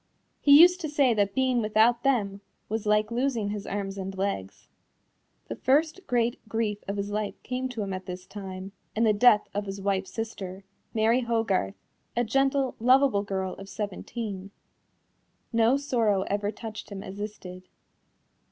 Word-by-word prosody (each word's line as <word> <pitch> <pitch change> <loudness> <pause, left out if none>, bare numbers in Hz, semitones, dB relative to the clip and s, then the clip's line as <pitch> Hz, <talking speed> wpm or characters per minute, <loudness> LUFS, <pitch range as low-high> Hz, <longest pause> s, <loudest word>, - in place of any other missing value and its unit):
He 285 0 +7
used 360 +2 +7
to 310 - -3
say 280 -4 +3
that 200 -2 0
being 260 -2 +2
without 220 +2 +3
them 205 -8 0 0.3
was 215 0 -2
"like 210 +1 +2
losing 240 -4 0
his 205 -1 -5
arms 195 -1 -3
and 190 0 -5
legs." 190 - -3 0.8
The 115 - -5
first 315 +7 +1
great 240 -1 +1
grief 220 -2 -1
of 200 +1 -3
his 200 +1 -3
life 210 0 -2
came 255 +1 -3
to 235 -4 -4
him 195 -1 -4
at 185 0 -6
this 180 0 -6
time, 190 -1 -7 0.2
in 225 - +2
the 220 -2 +4
death 210 0 +5
of 205 0 -3
his 195 +1 -5
wife's 195 -1 -1
sister, 195 -4 -5 0.3
Mary 225 +2 +3
Hogarth, 225 - 0 0.4
a 240 - +3
gentle, 270 +3 +1
lovable 255 -2 +4
girl 190 -2 -3
of 195 0 -10
seventeen. 205 -1 -5 1.0
No 230 +3 +4
sorrow 230 -8 +1
ever 205 +1 -1
touched 220 -1 -7
him 195 -1 -6
as 195 -1 -8
this 210 0 -5
did. 185 0 -11
210 Hz, 165 wpm, -27 LUFS, 195-240 Hz, 1.0 s, He